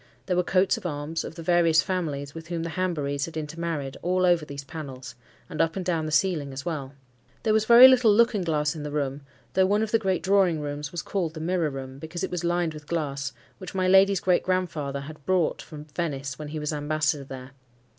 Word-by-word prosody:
There 180 - 0
were 180 - +3
coats 185 +1 +2
of - - -10
arms, 150 +1 -3
of - - -8
the 165 - -8
various 165 -3 +4
families 145 -7 -3
with 165 0 -9
whom 170 -1 -3
the 165 - -4
Hanburys 150 -6 -1
had 165 -1 -8
intermarried, 155 -3 -4
all 185 +1 +1
over 175 -3 +3
these 140 -1 -7
panels, 135 -3 -8 0.3
and 165 -3 -2
up 165 0 +1
and 190 -2 -4
down 165 -3 0
the - - -4
ceiling 155 -5 +1
as 135 +1 -7
well. 145 -5 -4 0.5
There 220 - +2
was 215 0 +2
very 240 +3 +10
little 250 -4 +5
looking 215 -1 +3
glass 150 -3 0
in 155 - -6
the 150 - -4
room, 145 -1 -2 0.3
though 190 0 +4
one 205 +2 +2
of 220 - -3
the 225 - +3
great 190 -4 -1
drawing 190 -4 +3
rooms 145 0 -5
was 175 - -4
called 175 -5 -2
the - - -6
"Mirror 170 -1 0
Room," 135 -1 -7
because 160 +3 -6
it - - -2
was 180 -1 -3
lined 175 -1 0
with 150 -1 -11
glass, 140 -4 -2 0.3
which 185 0 -8
my 185 -1 +1
lady's 195 0 +5
great 180 -1 +3
grandfather 160 -7 -2
had 150 +1 -10
brought 185 -3 +1
from 150 -1 -10
Venice 145 -4 -4
when 150 - -6
he 155 +1 -5
was 150 0 -2
ambassador 150 0 0
there. 130 -1 -9
160 Hz, 225 wpm, -26 LUFS, 145-185 Hz, 0.5 s, very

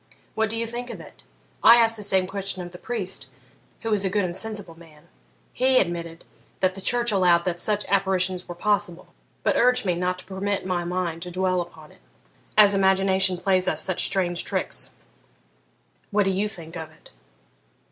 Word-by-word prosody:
What 220 0 0
do 225 - -4
you 230 - -1
think 240 +2 -6
of - - -7
it? - - -14 0.4
I 230 - +9
asked 230 -1 +4
the 215 - -6
same 190 -2 +2
question 195 -1 -4
of 175 - -9
the 180 - -11
priest, 190 - -4 0.5
who 225 -1 -1
is 200 -2 +2
a 190 - +1
good 200 0 +1
and 175 -1 -4
sensible 210 -5 -4
man; 165 -2 -18 0.5
he 260 +1 +3
admitted 170 -3 -1 0.4
that 185 -1 +2
the 195 - -9
church 240 +3 +1
allowed 180 -3 +3
that 175 -1 -2
such 210 +2 0
apparitions 190 -2 0
were 175 - -7
possible, 180 -2 -1 0.3
but - - +2
urged 250 -1 +3
me 180 - +2
not 180 +1 -1
to 185 - -12
permit 195 +1 -3
my 180 -2 -1
mind 175 -2 -3
to 180 - -6
dwell 185 0 0
upon 160 -3 -11
it, - - -22 0.6
as 205 -1 +7
imagination 190 -1 +3
plays 185 0 +1
us - - +3
such 185 -2 +1
strange 175 -3 +1
tricks. - - -1 1.2
What 205 -1 +2
do 195 - +2
you 200 +3 0
think 170 -5 -9
of 160 -1 -6
it?' 155 - -20
190 Hz, 190 wpm, -24 LUFS, 175-205 Hz, 1.2 s, I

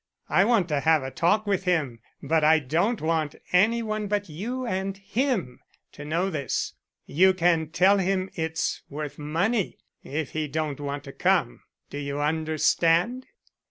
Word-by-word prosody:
I 195 - +4
want 220 -6 +3
to 150 -2 +1
have 160 -1 +3
a 130 - -5
talk 210 - +1
with 195 -2 0
him, 150 -10 0 0.2
but 155 +2 +1
I 160 +1 +6
don't 165 - 0
want 155 -2 0 0.2
any 225 +6 +4
one 215 -1 -2
but 205 -1 -1
you 235 +11 -4
and 195 -2 -2
him 200 - -2 0.3
to 145 - -10
know 170 +6 -1
this. 140 -6 -2 0.3
You 185 +5 +4
can 165 -3 +2
tell 185 +5 +4
him 190 0 0
it's 160 -1 -2
worth 150 0 -6
money, 175 +8 -1 0.3
if 150 0 -4
he 155 -1 -2
don't 150 -1 -3
want 145 0 -4
to 140 - -9
come. - - +1 0.3
Do 145 - -5
you 140 0 -4
understand?" 165 - +1
165 Hz, 160 wpm, -26 LUFS, 150-195 Hz, 0.3 s, I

